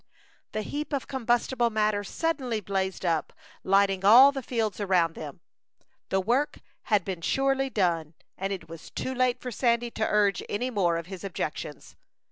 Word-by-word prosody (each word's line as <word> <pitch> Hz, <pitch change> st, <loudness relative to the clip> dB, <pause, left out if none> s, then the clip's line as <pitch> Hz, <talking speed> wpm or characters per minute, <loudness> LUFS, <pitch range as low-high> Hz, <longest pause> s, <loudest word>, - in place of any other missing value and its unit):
The 215 Hz, -, -2 dB
heap 295 Hz, +7 st, -5 dB
of 275 Hz, -, -2 dB
combustible 240 Hz, -1 st, +1 dB
matter 215 Hz, -2 st, +1 dB
suddenly 260 Hz, -1 st, -2 dB
blazed 190 Hz, -1 st, -2 dB
up, 165 Hz, -3 st, 0 dB, 0.3 s
lighting 195 Hz, 0 st, +3 dB
all 245 Hz, +8 st, +9 dB
the 275 Hz, -1 st, -4 dB
fields 225 Hz, -5 st, -2 dB
around 180 Hz, -5 st, +2 dB
them. 145 Hz, -4 st, -8 dB, 0.7 s
The 190 Hz, -, +2 dB
work 245 Hz, +9 st, 0 dB, 0.3 s
had 210 Hz, -6 st, +2 dB
been 185 Hz, -3 st, -4 dB
surely 270 Hz, +6 st, +1 dB
done, 170 Hz, -, 0 dB, 0.2 s
and 195 Hz, +1 st, -3 dB
it 185 Hz, -4 st, -5 dB
was 165 Hz, -1 st, -10 dB
too 260 Hz, -, -4 dB
late 255 Hz, -1 st, +1 dB
for 250 Hz, -, -6 dB
Sandy 235 Hz, +1 st, +1 dB
to 220 Hz, -, -1 dB
urge 205 Hz, -2 st, +2 dB
any 245 Hz, +5 st, -2 dB
more 175 Hz, -6 st, +1 dB
of 165 Hz, -, -5 dB
his 190 Hz, +1 st, -9 dB
objections. 155 Hz, -5 st, -5 dB
210 Hz, 165 wpm, -27 LUFS, 185-250 Hz, 0.7 s, all